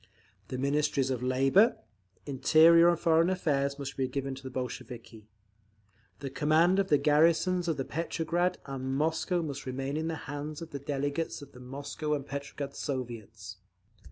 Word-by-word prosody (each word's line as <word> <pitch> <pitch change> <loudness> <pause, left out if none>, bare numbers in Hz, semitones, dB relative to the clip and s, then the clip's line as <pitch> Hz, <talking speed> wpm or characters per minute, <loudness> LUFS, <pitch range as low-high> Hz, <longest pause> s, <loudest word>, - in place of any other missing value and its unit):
The 130 - -5
Ministries 140 -1 +1
of 125 -2 -2
Labour, 135 - +4 0.5
Interior 160 +5 +6
and 170 - +2
Foreign 165 0 +3
Affairs 140 -6 0
must 135 -1 -6
be 130 -1 0
given 135 +1 -3
to 135 - -9
the 130 - -7
Bolsheviki. 120 -3 -7 0.9
The 135 -2 -5
command 160 +6 +3
of 195 - +1
the 150 - +4
garrisons 165 +5 +3
of 165 - 0
Petrograd 170 +2 -1
and 135 -1 -4
Moscow 160 +4 0
must 140 -3 -6
remain 135 +3 -3
in 160 +1 -2
the 165 - -2
hands 145 +1 -5
of 165 -1 -9
delegates 145 +2 -2
of 140 - -13
the 125 - -14
Moscow 140 +4 -4
and 140 -2 -5
Petrograd 140 0 -6
Soviets. 110 - -6
145 Hz, 155 wpm, -30 LUFS, 135-160 Hz, 0.9 s, Interior